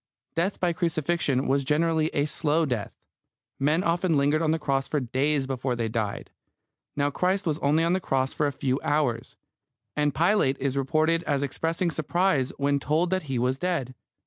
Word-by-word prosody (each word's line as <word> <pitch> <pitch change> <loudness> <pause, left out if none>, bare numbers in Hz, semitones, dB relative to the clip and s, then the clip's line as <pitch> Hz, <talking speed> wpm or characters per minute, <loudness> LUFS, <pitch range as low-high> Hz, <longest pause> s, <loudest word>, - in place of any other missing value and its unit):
Death 175 +5 -1
by 175 -2 +1
crucifixion 160 -4 0
was 140 +1 +2
generally 155 +2 +1
a 145 -2 0
slow 155 +1 +1
death. 125 -7 -3 0.6
Men 150 +6 +2
often 170 -2 +1
lingered 145 +3 +2
on 160 - +1
the 160 - +2
cross 135 -3 -1
for 150 - 0
days 135 +3 0
before 130 -1 -2
they 115 -1 -2
died. 110 -3 -3 0.6
Now, 145 0 +1
Christ 185 +5 0
was 155 -2 -1
only 150 +2 +2
on 170 +1 +2
the 190 - +2
cross 135 -6 -1
for 150 - +1
a - - -1
few 135 -1 -1
hours; 145 -6 -1 0.6
and 150 -1 +1
Pilate 170 -6 +2
is 135 0 -1
reported 155 +4 +1
as 140 -1 0
expressing 165 +5 -1
surprise 155 -2 +1
when 140 0 +1
told 160 +5 0
that 185 -6 -1
he 130 - -1
was 125 +2 0
dead. 170 -9 -2
150 Hz, 180 wpm, -26 LUFS, 135-165 Hz, 0.6 s, was